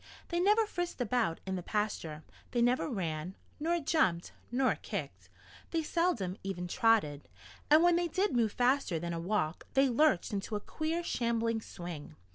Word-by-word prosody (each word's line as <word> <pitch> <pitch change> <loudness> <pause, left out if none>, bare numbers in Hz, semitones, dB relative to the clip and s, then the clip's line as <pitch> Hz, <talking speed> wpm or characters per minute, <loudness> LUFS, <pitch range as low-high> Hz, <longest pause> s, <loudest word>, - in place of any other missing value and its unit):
They 345 - 0
never 420 +5 +4
frisked 350 -6 -4
about 235 -7 0
in 190 0 -2
the - - -4
pasture. 175 -6 -2 0.3
They 240 - +2
never 250 +5 +2
ran, 175 - -3 0.2
nor 340 +3 +1
jumped, 280 - +1 0.2
nor 255 +1 +3
kicked. - - -5 0.4
They 330 -1 0
seldom 300 - 0
even 185 -2 -4
trotted. 205 - +2 0.4
And 310 +3 +7
when 350 -1 +5
they 350 0 +1
did 380 +1 0
move 225 -3 +2
faster 250 -7 +2
than 170 +1 -3
a 165 - -3
walk 170 -3 -1
they 270 0 +5
lurched 240 - +3
into 200 +2 -2
a - - 0
queer, 320 +9 -3
shambling 230 -5 0
swing. 170 - -8
230 Hz, 165 wpm, -32 LUFS, -, 0.4 s, And